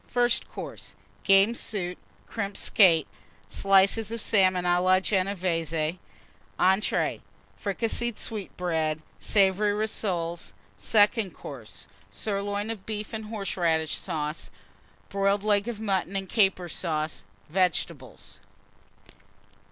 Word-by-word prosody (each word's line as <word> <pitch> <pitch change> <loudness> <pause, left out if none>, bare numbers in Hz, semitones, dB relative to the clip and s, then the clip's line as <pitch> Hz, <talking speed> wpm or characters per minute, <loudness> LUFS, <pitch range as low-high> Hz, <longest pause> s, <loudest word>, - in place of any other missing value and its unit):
FIRST 240 -1 +1
COURSE. - - -8 0.3
Game 195 +3 +5
Soup. 185 -6 -3 0.3
Crimped 200 -3 -4
Skate. 170 -7 +5 0.4
Slices 195 - +3
of 230 - -3
Salmon 185 -4 +3
a 175 0 +3
la 185 +1 +4
Genévése. 180 -4 -1 0.6
ENTREES. 190 +4 +2 0.4
Fricasseed 230 +3 -1
Sweetbreads. 165 -7 -2 0.2
Savoury 205 0 +3
Rissoles. 180 -5 -2 0.2
SECOND 210 - +2
COURSE. 110 -7 -9 0.2
Sirloin 205 - -2
of 210 -4 -7
Beef 215 0 -5
and 220 -1 -4
Horseradish 175 -7 -1
Sauce. 155 -3 -4 0.6
Boiled 200 0 +1
Leg 205 0 +2
of 235 -3 -4
Mutton 195 -3 -1
and 195 -1 -2
Caper 195 -4 +2
Sauce. 155 -6 -3 0.3
Vegetables. 180 -2 -2
195 Hz, 100 wpm, -27 LUFS, 175-210 Hz, 0.6 s, Game